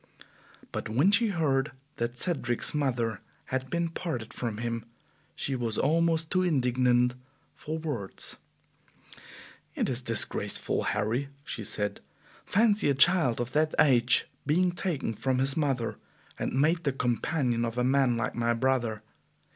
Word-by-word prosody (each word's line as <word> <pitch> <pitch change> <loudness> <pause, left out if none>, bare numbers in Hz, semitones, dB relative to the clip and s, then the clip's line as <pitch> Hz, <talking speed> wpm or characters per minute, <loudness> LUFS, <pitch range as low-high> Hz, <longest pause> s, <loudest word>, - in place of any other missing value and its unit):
But - - -4
when 140 - +3
she 225 +3 +4
heard 150 -8 0 0.2
that 120 +1 -2
Cedric's 120 -8 0
mother 120 -7 -1 0.2
had 130 0 -3
been 170 +2 0
parted 130 -10 -5
from 115 -4 -4
him 115 0 -3 0.5
she 135 - -2
was 115 -4 -2
almost 165 0 +1
too 185 - +3
indignant 125 -6 +2 0.4
for 155 +1 -5
words. 145 -12 -5 1.4
"It - - 0
is 125 0 -2
disgraceful, 115 -3 0 0.2
Harry!" 120 +7 -1
she 115 - -5
said. 105 0 0 0.4
"Fancy 210 -4 +2
a 140 - +2
child 140 -4 +5
of 120 0 -3
that 155 +2 +1
age 120 -4 +4 0.2
being 180 +4 +3
taken 175 -9 -2
from 130 +4 -1
his 135 +2 +1
mother, 135 -7 -1 0.4
and 130 - -1
made 165 +4 +2
the 140 - 0
companion 125 -1 0
of 115 0 -3
a 125 - +2
man 130 -2 +3
like 115 - -2
my 120 0 0
brother! 120 -3 0
130 Hz, 140 wpm, -28 LUFS, 120-155 Hz, 1.4 s, child